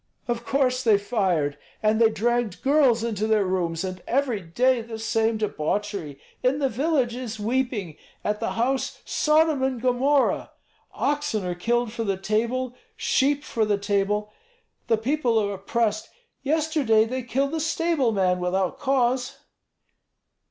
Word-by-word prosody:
"Of 235 -1 -2
course 255 0 +1
they 220 -4 +5
fired! 185 -9 0 0.2
And 215 +1 +3
they 225 - +6
dragged 235 -1 -1
girls 270 -5 +4
into 215 -2 -1
their 215 -2 +3
rooms, 175 -2 -1
and 185 -1 -5
every 255 -4 +1
day 240 +9 +1
the 225 0 -7
same 225 0 0
debauchery. 200 -5 -3 0.2
In 255 +2 +2
the 275 -2 +1
village 265 -1 0
is 235 -4 -6
weeping, 225 - -1 0.3
at 210 0 -1
the - - -2
house 255 +4 -1
Sodom 310 -2 +2
and 265 -2 0
Gomorrah. 255 +3 +1 0.4
Oxen 285 -9 -1
are 180 - -1
killed 235 +5 0
for 230 - -3
the 195 -3 -1
table, 235 +6 -1 0.2
sheep 285 +2 +1
for 225 - -1
the 210 -1 +1
table. 205 +1 -1 0.5
The 225 -1 +3
people 245 0 +1
are 205 -2 +1
oppressed. 215 +2 -1 0.3
Yesterday 285 -6 +2
they 255 +3 -3
killed 270 +3 -1
the 325 - -2
stable 325 -5 +1
man 185 -3 +1
without 180 +1 -1
cause." 260 0 +1
230 Hz, 145 wpm, -25 LUFS, 205-260 Hz, 0.5 s, they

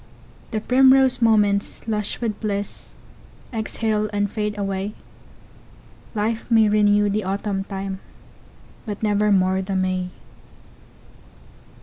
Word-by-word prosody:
The 220 - -2
primrose 260 +2 +4
moments, 210 -2 +2
lush 210 -2 -2
with 220 -3 -2
bliss, 205 -2 -4 0.6
Exhale 220 -1 -1
and 205 -1 -1
fade 210 -1 -2
away, 195 0 -2 1.2
Life 220 +2 -2
may 225 -2 +5
renew 205 0 +3
the 205 +1 0
Autumn 195 0 -2
time, 195 -1 -5 0.9
But 210 0 -5
nevermore 200 -3 +2
the 190 0 -3
May! 185 -1 0
210 Hz, 100 wpm, -22 LUFS, 195-220 Hz, 1.2 s, may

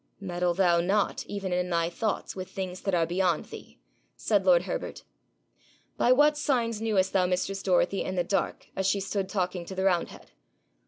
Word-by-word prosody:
'Meddle 175 -2 -1
thou 175 -2 +3
not, 200 +4 0
even 195 -3 -3
in 180 0 0
thy 170 -1 +1
thoughts, 210 +5 -3
with 185 -1 -6
things 185 -1 -5
that 195 -3 0
are 165 -1 +2
beyond 175 +1 0
thee,' - - -12 0.4
said - - 0
lord - - +6
Herbert. - - -5 0.9
'By 245 - +3
what 295 +3 +5
signs 240 -7 0
knewest 200 -4 +1
thou 185 -2 +3
mistress 185 +2 -1
Dorothy 190 +1 +2
in 185 - -4
the 175 - +1
dark 195 +3 -2
as 190 0 0
she 200 +1 +2
stood 195 0 -3
talking 185 -2 -2
to 190 +2 -8
the 190 - -1
roundhead?' 180 -3 -1
190 Hz, 180 wpm, -28 LUFS, 180-200 Hz, 0.9 s, lord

